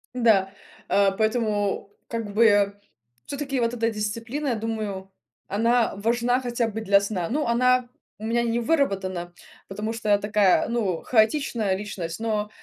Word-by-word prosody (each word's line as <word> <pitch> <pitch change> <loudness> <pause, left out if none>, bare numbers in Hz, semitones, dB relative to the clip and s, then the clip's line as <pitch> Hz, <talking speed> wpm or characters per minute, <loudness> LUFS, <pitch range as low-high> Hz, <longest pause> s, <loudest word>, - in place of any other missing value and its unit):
Да, 215 -6 +3 0.4
а, 200 -1 +4
поэтому 215 -2 0 0.2
как 225 -3 -4
бы 205 -2 +4 0.5
всё-таки 275 -2 -3
вот 230 0 0
эта 230 -1 0
дисциплина, 230 +7 -3
я 240 - +1
думаю, 215 -4 -4 0.4
она 230 +3 +1
важна 240 +4 +1
хотя 240 -2 -1
бы 220 0 -5
для 200 -2 +4
сна. 200 -4 -3
Ну, 295 +5 0
она 250 +1 +3 0.3
у 215 - -6
меня 235 +1 +1
не 235 0 0
выработана, 195 - -1 0.3
потому 210 +3 -4
что 225 -2 -4
я 205 - +6
такая, 205 -2 +3
ну, 210 -8 -1
хаотичная 220 -3 +1
личность, 190 -4 -5
но 215 -2 -1
220 Hz, 145 wpm, -25 LUFS, 200-235 Hz, 0.5 s, я